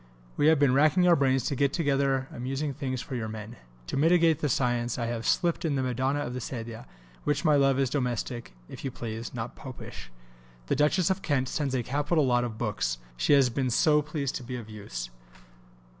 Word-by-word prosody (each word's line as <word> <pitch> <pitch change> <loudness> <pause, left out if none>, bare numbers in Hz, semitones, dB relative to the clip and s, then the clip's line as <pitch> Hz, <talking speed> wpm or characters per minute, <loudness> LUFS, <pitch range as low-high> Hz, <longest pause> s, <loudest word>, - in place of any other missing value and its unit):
We 150 - +3
have 160 0 +6
been 140 -2 +4
racking 155 +6 +4
our 175 - +7
brains 135 -3 +2
to 140 - -1
get 140 +1 +1
together 135 -4 +1
amusing 135 +4 -3
things 130 -2 -3
for - - -8
your 115 -3 -2
men.... 110 +1 -7 0.3
To - - -4
mitigate 165 +1 +4
the 150 - 0
science 120 -2 0
I 120 - -1
have 115 -1 -3
slipped 170 -1 +1
in 155 -4 0
the 135 - 0
Madonna 130 +3 0
of 125 - -4
the 125 - -3
Sedia; 115 -1 -6 0.4
which, 145 0 0
my 150 -2 +5
love, 135 -1 +4
is 135 -2 +1
domestic, 120 - -2
if - - -10
you 135 - -1
please, 115 -2 -6
not 120 0 -5
Popish. 125 - -9 0.6
The - - 0
Duchess 155 +6 +3
of 190 +1 -1
Kent 135 -7 0
sends 140 -4 -1
a 125 - 0
capital 145 +4 +1
lot 120 -1 +2
of 115 -3 -4
books; 105 - -1 0.2
she - - +2
has 135 -3 +5
been 130 +1 0
so 150 +5 +4
pleased 150 -2 -3
to 130 - -9
be 125 +1 -5
of 115 -3 -8
use. - - -6
130 Hz, 210 wpm, -28 LUFS, 120-145 Hz, 0.6 s, our